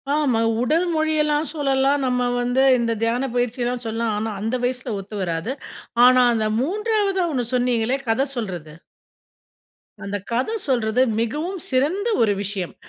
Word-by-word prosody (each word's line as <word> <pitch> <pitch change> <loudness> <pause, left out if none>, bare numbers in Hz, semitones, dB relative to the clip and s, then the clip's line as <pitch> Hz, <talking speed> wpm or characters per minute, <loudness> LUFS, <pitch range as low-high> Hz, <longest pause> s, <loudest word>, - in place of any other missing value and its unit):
ஆமா. 275 -7 +2 0.2
உடல் 315 +8 +2
மொழியெல்லாம் 310 -1 +1
சொல்லலாம். 275 -1 +1
நம்ம 250 -1 +1 0.2
வந்து 245 +2 +2
இந்த 230 -1 0
தியான 245 +4 0
பயிற்சி 245 0 -1
எல்லாம் 245 0 -2
சொல்லலாம், 225 0 -1
ஆனா 220 +1 -2
அந்த 225 +4 -1
வயசுல 250 -2 -2
ஒத்து 200 +2 -9
வராது. 170 +6 -2 0.5
ஆனா, 255 0 +6
அந்த 220 -1 0
3வதா 405 - 0
ஒண்ணு 245 -2 -1
சொன்னீங்களே 245 0 +1
கத 260 +5 +2
சொல்றது 175 -9 -5 1.3
அந்த 200 +1 -3
கத 250 - 0 0.2
சொல்றது, 240 -2 +1 0.2
மிகவும் 305 - -2
சிறந்த 305 - +1
ஒரு 210 -2 +3
விஷயம். 190 -3 -4
250 Hz, 140 wpm, -22 LUFS, 225-290 Hz, 1.3 s, ஆனா